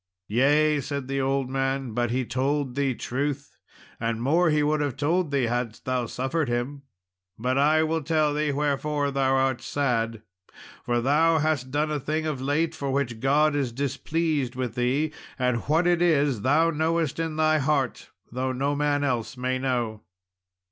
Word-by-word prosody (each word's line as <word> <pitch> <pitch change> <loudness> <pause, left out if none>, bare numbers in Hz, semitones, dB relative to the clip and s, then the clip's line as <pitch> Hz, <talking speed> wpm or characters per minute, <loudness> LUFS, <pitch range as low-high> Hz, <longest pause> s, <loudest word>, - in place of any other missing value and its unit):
"Yea," 145 +6 +3
said 140 0 -4
the 135 0 -1
old 135 0 0
man, 135 -1 -1
"but 120 +1 0
he 125 +2 -1
told 135 +1 -1
thee 135 -1 0
truth, 140 +4 -4 0.4
and 115 -1 -1
more 160 +8 +3
he 150 -1 +2
would 150 0 +1
have 140 -3 -2
told 165 +4 +1
thee 140 -2 +1
hadst 120 -1 -3
thou 125 -2 -1
suffered 135 +4 -2
him. 120 +4 -2 0.6
But 125 +4 0
I 155 +2 +4
will 160 +1 0
tell 155 -1 +1
thee 150 0 0
wherefore 145 0 0
thou 135 -1 +2
art 130 -2 +1
sad, 115 -5 -1 0.6
for 120 -1 0
thou 160 +6 +3
hast 150 -4 0
done 150 +3 0
a 150 - -1
thing 155 +3 -2
of 150 -4 -2
late 155 +4 0
for 140 -3 -4
which 130 -4 -1
God 145 +4 +3
is 135 -4 0
displeased 140 +1 -1
with 125 -3 -3
thee, 135 +6 0 0.2
and 125 -2 +1
what 160 +3 +3
it 175 -1 +3
is 145 -9 +2
thou 155 +7 +3
knowest 160 -1 0
in 160 -1 -2
thy 155 0 +3
heart, 135 -2 -1 0.2
though 130 +2 -2
no 140 +3 -1
man 145 0 +1
else 125 -2 -2
may 130 +1 -1
know." 120 -5 -1
140 Hz, 175 wpm, -26 LUFS, 130-150 Hz, 0.6 s, I